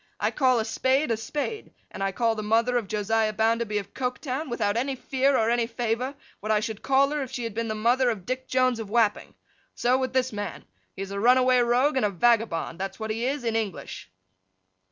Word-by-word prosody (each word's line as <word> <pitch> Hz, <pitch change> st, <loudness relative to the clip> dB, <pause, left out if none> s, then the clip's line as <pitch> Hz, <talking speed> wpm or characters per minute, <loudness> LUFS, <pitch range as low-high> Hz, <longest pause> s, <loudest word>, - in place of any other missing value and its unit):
I -, -, +1 dB
call 255 Hz, -4 st, +3 dB
a 220 Hz, -, -1 dB
spade 260 Hz, +4 st, +1 dB
a -, -, +3 dB
spade; 295 Hz, -, -5 dB, 0.2 s
and -, -, -8 dB
I 195 Hz, 0 st, 0 dB
call 230 Hz, +3 st, +1 dB
the 215 Hz, -, -4 dB
mother 225 Hz, +3 st, +2 dB
of 235 Hz, -4 st, 0 dB
Josiah 215 Hz, +2 st, 0 dB
Bounderby 225 Hz, 0 st, +1 dB
of 200 Hz, -, -5 dB
Coketown, 260 Hz, +3 st, -3 dB
without 205 Hz, -4 st, 0 dB
any 265 Hz, +3 st, -1 dB
fear 265 Hz, +1 st, +1 dB
or 225 Hz, +1 st, +2 dB
any 235 Hz, -1 st, +1 dB
favour, 240 Hz, +3 st, -2 dB, 0.2 s
what 215 Hz, -, -3 dB
I 215 Hz, -, +4 dB
should 215 Hz, 0 st, -5 dB
call 275 Hz, +1 st, +3 dB
her 300 Hz, -1 st, -1 dB
if 265 Hz, -, -4 dB
she 250 Hz, -2 st, -5 dB
had 230 Hz, -2 st, -4 dB
been 230 Hz, +1 st, -2 dB
the 215 Hz, -, -2 dB
mother 245 Hz, +4 st, +2 dB
of 205 Hz, -6 st, -4 dB
Dick 255 Hz, +2 st, -4 dB
Jones 255 Hz, -2 st, +2 dB
of 220 Hz, -3 st, -6 dB
Wapping. 220 Hz, -2 st, +1 dB, 0.4 s
So, 250 Hz, +2 st, +2 dB
with 260 Hz, -1 st, -2 dB
this 260 Hz, -2 st, +1 dB
man. 205 Hz, -1 st, -5 dB, 0.3 s
He 195 Hz, -, -4 dB
is 195 Hz, -, -8 dB
a 200 Hz, -, -3 dB
runaway 255 Hz, +2 st, +5 dB
rogue 250 Hz, +4 st, +2 dB
and 255 Hz, -, +2 dB
a -, -, -2 dB
vagabond, 200 Hz, -5 st, +1 dB
that's 195 Hz, +2 st, -5 dB
what 220 Hz, 0 st, -3 dB
he 230 Hz, +3 st, -1 dB
is, 275 Hz, -1 st, -2 dB
in 230 Hz, -1 st, -1 dB
English. 210 Hz, -, -4 dB
235 Hz, 225 wpm, -26 LUFS, 215-255 Hz, 0.4 s, runaway